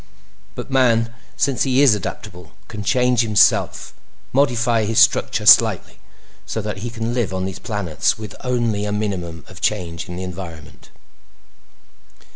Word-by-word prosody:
"But - - -7
man, 115 -3 +2 0.2
since 135 -2 0
he 135 +1 +3
is 135 -6 +6
adaptable, 90 -4 -7
can 105 -2 -7
change 125 +1 +2
himself—modify 120 +2 0
his 110 +1 -2
structure - - +3
slightly—so - - +2
that 105 -2 -4
he 115 +4 -5
can 115 0 -4
live 115 -6 -2
on 95 0 -2
these 95 0 -6
planets 100 - -1
with 110 -2 -8
only 120 -5 -1
a 105 - -3
minimum 90 -6 -4
of - - -13
change 85 -2 -2
in 90 - -6
the 90 - -5
environment." 85 -4 -9
105 Hz, 135 wpm, -20 LUFS, 95-120 Hz, 0.2 s, is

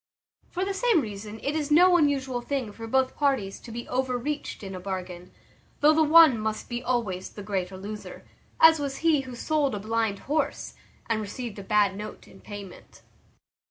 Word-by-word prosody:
From 370 +1 -2
the 395 - -2
same 445 -2 +3
reason 210 -3 -6
it 285 - -1
is 305 -2 -1
no 355 +4 +6
unusual 270 -6 +1
thing 255 -3 -3
for 225 +2 -8
both 265 +2 +1
parties 265 -10 0
to 235 - -11
be 240 +1 -6
overreached 260 +1 -2
in 195 -1 -6
a 185 - -6
bargain, 180 -1 -6 0.5
though 300 +2 +6
the 315 - +3
one 315 -5 +7
must 215 0 -3
be 240 0 -3
always 230 -8 -2
the 205 - -10
greater 190 -2 -3
loser; 210 +2 -8 0.3
as 320 -1 +7
was 280 -2 -3
he 310 -4 +4
who 255 -2 -9
sold 290 -1 0
a - - -4
blind 220 -1 -1
horse, 290 +5 -2 0.3
and 225 -1 0
received 215 +1 -6
a - - -7
bad 205 -1 +2
note 210 +1 -8
in - - -16
payment. 205 -3 -11
240 Hz, 185 wpm, -26 LUFS, 205-290 Hz, 0.5 s, one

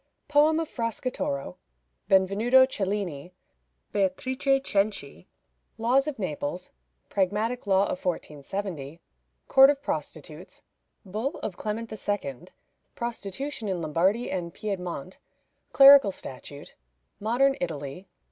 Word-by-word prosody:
Poem 300 +2 +4
of 325 - -2
Fracastoro. 230 - -3 0.5
Benvenuto 210 +7 +5
Cellini. 190 - -3 0.6
Beatrice 260 +8 +1
Cenci. 195 - -2 0.5
Laws 255 +5 +2
of 300 - -3
Naples. 180 -2 -4 0.4
Pragmatic 210 +5 -1
Law 195 0 +4
of 180 - -3
1470. 165 -2 -4 0.5
Court 270 0 +8
of 290 -1 +1
Prostitutes. - - -6 0.4
Bull 220 - -3
of 185 - -3
Clement 220 +3 -4
II. 185 -8 -4 0.5
Prostitution 235 +2 -5
in 185 -2 -1
Lombardy 175 +9 +1
and 175 -2 -3
Piedmont. 185 -5 -5 0.5
Clerical 275 -6 +8
Statute. 140 -3 -9 0.5
Modern 250 +6 +2
Italy. 155 +1 -5
200 Hz, 100 wpm, -27 LUFS, 180-250 Hz, 0.6 s, Court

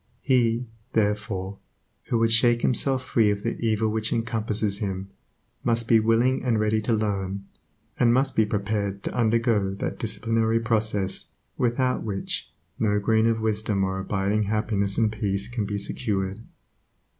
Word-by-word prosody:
He, 120 -2 +2 0.3
therefore, 105 -2 -1 0.5
who 120 - 0
would 115 0 +2
shake 120 +1 +3
himself 130 +1 +2
free 110 -3 +3
of 100 0 -1
the 115 - -2
evil 110 -1 +1
which 110 0 -1
encompasses 110 -3 0
him, 95 -2 -4 0.5
must 115 -1 +1
be 115 -1 +6
willing 115 +4 +2
and 120 -4 +1
ready 110 0 +1
to 110 - -2
learn, 100 -2 -2 0.5
and 120 -1 +5
must 130 +3 +2
be 110 - +4
prepared 100 -1 -2
to - - -3
undergo 115 -4 +1
that - - -4
disciplinary 115 0 0
process 110 -4 0 0.3
without 125 +1 0
which 100 -3 -2 0.3
no 105 -2 +2
grain 110 +2 +2
of 115 -1 +1
wisdom 105 -2 0
or 95 0 -1
abiding 100 +2 0
happiness 105 -1 0
and 110 -2 +2
peace 100 -2 -2
can 120 -3 -3
be 105 0 -2
secured. 100 -2 -2
110 Hz, 150 wpm, -25 LUFS, 100-115 Hz, 0.5 s, be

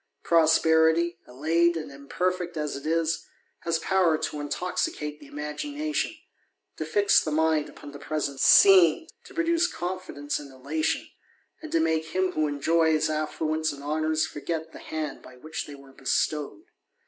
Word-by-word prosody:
Prosperity, 160 +1 +3
allayed 165 +6 +1
and 155 - -6
imperfect 175 +5 -3
as 150 -2 -2
it 140 +2 -6
is, 165 0 0 0.4
b.s 165 -1 +1
power 170 -1 +2
to 150 - -4
intoxicate 150 -1 -3
the 145 - -14
imagination, 290 - -3 0.6
to 155 - -3
fix 200 +6 +3
the - - -3
mind 155 0 +1
upo 145 - -11
the 145 - -10
present 140 -2 -3
scene, 190 - +7 0.2
to - - -14
produce 335 +1 +2
confidence 175 -5 -4
and 140 -2 -11
elation, 140 +4 -2 0.5
and 315 - -5
X< 165 - +3
make 160 -1 +1
him 185 0 +2
who 155 -3 0
enjoys 155 +2 +2
affluence 155 +1 -1
and 140 0 -10
honours 155 +1 0
forget 160 +2 -5
the - - -11
banc 155 -3 -4
by 130 0 -14
which 155 +5 -6
they 145 - -9
were 140 -1 -16
bestowed. 150 - -1
160 Hz, 150 wpm, -26 LUFS, 150-170 Hz, 0.6 s, scene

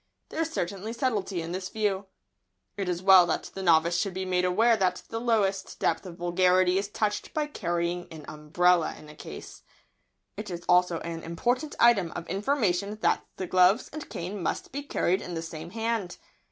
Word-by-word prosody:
There 320 - -3
is 325 - -1
certainly 200 - -3
subtlety 210 -8 -1
in 165 - -6
this 185 +1 -4
view. 205 -2 -1 0.7
It 195 -2 -3
is 175 0 -2
well 190 -2 +8
that 160 - -2
the 195 - -6
novice 170 -1 +4
should 195 -3 -2
be 190 0 -3
made 180 -1 +1
aware 225 +6 +4
that 185 -3 0
the 225 0 -4
lowest 200 -5 0
depth - - 0
of 170 -1 -9
vulgarity 180 +1 +3
is 200 - -3
touched 210 0 -2
by 305 -1 +1
carrying 175 - -2
an 155 -2 -10
umbrella 165 +3 +1
in 150 - -13
a 150 - -12
case. - - -10 0.8
It 210 -1 -6
is 175 -1 -6
also 180 -1 +3
an 165 -1 -5
important 245 - -1
item 205 -8 +5
of 165 - -5
information 200 -1 0
that - - +2
the 190 - -4
gloves 185 +5 +3
and 310 0 -7
cane 185 +3 -5
must 170 - -3
be 285 - -4
carried 190 -10 0
in 175 - -6
the 165 - -3
same 165 0 -7
hand. 225 -3 -2
185 Hz, 190 wpm, -27 LUFS, 175-210 Hz, 0.8 s, well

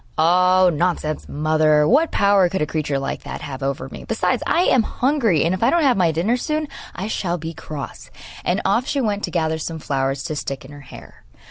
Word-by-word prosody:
'Oh, 180 +3 +4
nonsense, 155 -1 -1
mother; 155 0 +2
what 305 +7 +4
power 200 -3 +3
could 190 - -2
a - - +1
creature 150 -2 -2
like 135 - -4
that - - -7
have 135 -1 -7
over 135 -1 -3
me? - - -9
Besides, - - 0
I 340 - +3
am 255 - +4
hungry, 230 - +1
and 170 - +1
if 185 - -3
I 230 - +4
don't 340 -1 +2
have 265 -4 +4
my 175 -4 +2
dinner 185 +10 0
soon, 305 +4 -2 0.3
I 190 - -4
shall 180 -5 -2
be 165 0 -6
cross.' 150 -3 -8 0.3
And 180 +2 0
off 235 +7 +1
she 285 - -1
went 210 -5 -1
to - - -8
gather 160 -2 -1
some 160 +1 -4
flowers 135 -2 -2
to 155 - -4
stick 135 -2 -5
in 135 - -12
her 145 0 -11
hair. 130 - -14
170 Hz, 220 wpm, -21 LUFS, 150-205 Hz, 0.3 s, Oh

